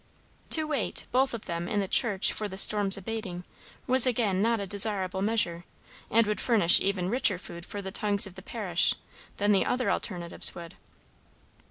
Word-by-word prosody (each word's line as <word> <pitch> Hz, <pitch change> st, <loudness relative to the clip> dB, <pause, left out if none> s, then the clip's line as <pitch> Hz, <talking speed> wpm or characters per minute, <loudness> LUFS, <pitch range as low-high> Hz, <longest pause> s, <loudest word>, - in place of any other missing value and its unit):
To 315 Hz, -, +5 dB
wait, 285 Hz, -8 st, -2 dB
both 260 Hz, +2 st, +1 dB
of 225 Hz, -, -10 dB
them, 170 Hz, -1 st, -5 dB
in 210 Hz, -, -1 dB
the 195 Hz, -, -2 dB
church, 200 Hz, -1 st, +1 dB
for 215 Hz, -, -4 dB
the 190 Hz, -1 st, -9 dB
storm's 200 Hz, -1 st, +3 dB
abating, 195 Hz, -3 st, -6 dB, 0.4 s
was 260 Hz, 0 st, +6 dB
again 215 Hz, -6 st, 0 dB
not 230 Hz, +1 st, +1 dB
a 200 Hz, -, -4 dB
desirable 195 Hz, -1 st, 0 dB
measure, 195 Hz, -5 st, -1 dB, 0.5 s
and 230 Hz, 0 st, +3 dB
would 210 Hz, 0 st, -2 dB
furnish 210 Hz, -8 st, +5 dB
even 190 Hz, -2 st, -1 dB
richer 205 Hz, -3 st, +1 dB
food 170 Hz, -1 st, -11 dB
for 205 Hz, -1 st, -7 dB
the 190 Hz, -, -6 dB
tongues 205 Hz, 0 st, 0 dB
of 195 Hz, -, -11 dB
the 190 Hz, -, -12 dB
parish 190 Hz, -5 st, 0 dB, 0.4 s
than 205 Hz, +1 st, +1 dB
the 195 Hz, -, +3 dB
other 250 Hz, 0 st, -1 dB
alternatives 175 Hz, -4 st, 0 dB
would. 170 Hz, -1 st, -10 dB
200 Hz, 180 wpm, -27 LUFS, 185-225 Hz, 0.5 s, was